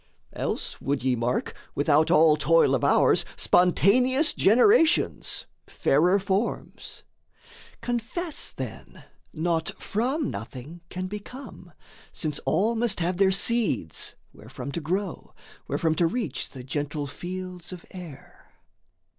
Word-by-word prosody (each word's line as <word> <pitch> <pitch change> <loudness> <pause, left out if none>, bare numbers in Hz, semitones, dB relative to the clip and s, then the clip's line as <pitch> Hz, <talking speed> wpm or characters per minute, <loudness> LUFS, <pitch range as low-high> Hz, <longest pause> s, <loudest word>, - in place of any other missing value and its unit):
Else - - -4
would 135 -1 -1
ye 130 -1 +2
mark, 120 +1 -1 0.2
without 150 +1 +3
all 155 0 +6
toil 155 -1 +3
of 130 - 0
ours, - - +4
Spontaneous 250 - +3
generations, 325 - +3 0.2
fairer 175 +8 +2
forms. 195 +3 -3 0.8
Confess 245 +8 -2
then, - - -8 0.3
naught 165 0 -1
from 260 +7 -1
nothing 130 +10 -8
can 185 0 -4
become, 210 +8 -9 0.4
Since 150 -3 -2
all 220 +5 +2
must 230 -4 0
have 175 +1 -1
their 195 0 +4
seeds, 195 - +1 0.2
wherefrom 140 - -8
to 170 - -4
grow, 185 +4 -4 0.3
Wherefrom 160 -1 0
to 170 - +3
reach 180 - -3
the 130 - -10
gentle 145 +2 -3
fields 180 +4 -7
of 180 -2 -9
air. 175 -7 -12
180 Hz, 115 wpm, -26 LUFS, 150-220 Hz, 0.8 s, all